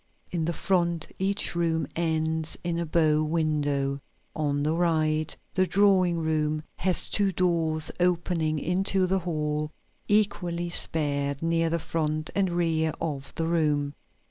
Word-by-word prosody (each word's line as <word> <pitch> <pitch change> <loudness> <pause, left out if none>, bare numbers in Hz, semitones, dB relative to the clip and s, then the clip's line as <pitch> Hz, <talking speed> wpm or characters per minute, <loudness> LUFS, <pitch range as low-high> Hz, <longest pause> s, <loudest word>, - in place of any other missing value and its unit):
In 165 -3 -1
the 170 - 0
front 170 -2 0
each 195 +2 0
room 165 -1 0
ends 160 -1 -1
in 170 -1 -1
a 170 - -2
bow 155 -1 +3
window. 145 -3 0 0.3
On 145 -2 0
the 155 +2 +1
right 155 -2 +1 0.2
the 185 -1 +2
drawing 185 -3 +3
room 155 -1 0
has 185 0 +1
two 200 -2 +2
doors 165 -3 +1
opening 170 -3 +1
into 185 +4 +2
the 190 +1 +1
hall, 150 -3 -2 0.4
equally 180 -5 +1
spaced 140 -4 0
near 165 0 +2
the 170 - 0
front 155 -1 -2
and 195 -2 +1
rear 165 -2 +1
of 140 -4 -4
the 165 - -1
room. 150 -4 +1
165 Hz, 140 wpm, -27 LUFS, 155-175 Hz, 0.4 s, bow